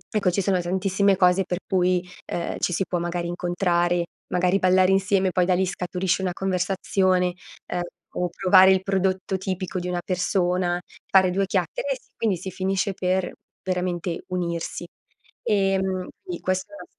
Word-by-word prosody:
Ecco, 195 -4 +2
ci 195 - 0
sono 185 -1 +1
tantissime 190 +2 +2
cose 180 +1 +4
per 180 0 -2
cui, 180 -1 +2 0.2
ehm, 170 - -3
ci - - 0
si 195 - 0
può 175 - -1
magari 175 0 -2
incontrare, 175 0 0 0.3
magari 180 +2 +2
ballare 185 0 +4
insieme, 195 -1 +2
poi 180 -1 +2
da 185 - +2
lì 190 +1 +2
scaturisce 180 0 -1
una 180 -1 -1
conversazione, 185 -1 +1 0.4
uhm, 175 - 0 0.4
o 175 - 0
provare 190 +1 +6
il 190 0 +3
prodotto 190 -1 0
tipico 185 0 -4
di 180 - -4
una 175 -1 -2
persona, 180 -1 0 0.3
fare 190 -2 +5
due 195 +1 +1
chiacchere. - - -1
E - - -6
sì, - - -31
quindi 205 -6 0
si 190 +2 -6
finisce 190 +2 -1
per, 185 0 0 0.3
veramente, 180 -2 -2
unirsi. 175 -1 -3 0.6
Ehm, 190 -2 +1 0.2
sì 360 -2 -5
questo 185 +6 -2
era 305 - -9
185 Hz, 165 wpm, -24 LUFS, 180-190 Hz, 0.6 s, provare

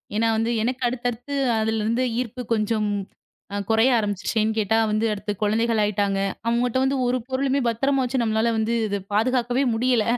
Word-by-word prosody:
ஏன்னா 225 +2 +2
வந்து, 225 +1 0
எனக்கு 250 +2 -2
அடுத்தடுத்து 245 +2 -3 0.3
அதுல 220 0 0
இருந்து 230 +4 +1 0.2
ஈர்ப்பு 250 0 -4
கொஞ்சம் 215 -1 0 0.6
அ - - -1
குறைய 225 +4 +4
ஆரம்பிச்சுச்சு. 205 0 -2
ஏன் 215 +1 +1
கேட்டா 220 +1 +2
வந்து, 215 +1 +1
அடுத்து 210 +1 -4
குழந்தைகள் 225 +2 +1
ஆயிட்டாங்க. 200 -1 0 0.3
அவங்க 235 +1 +1
கிட்ட 245 +2 0
வந்து 270 +1 +1
ஒரு 245 +1 +1
பொருளுமே 270 +1 0
பத்திரமா 270 +4 +1
வச்சு 255 0 -1
நம்மளால 220 +1 +1
வந்து 220 +1 0
இது 200 -1 -1 0.2
பாதுகாக்கவே 245 +3 +1
முடியல. 240 0 +2
230 Hz, 170 wpm, -23 LUFS, 215-250 Hz, 0.6 s, குறைய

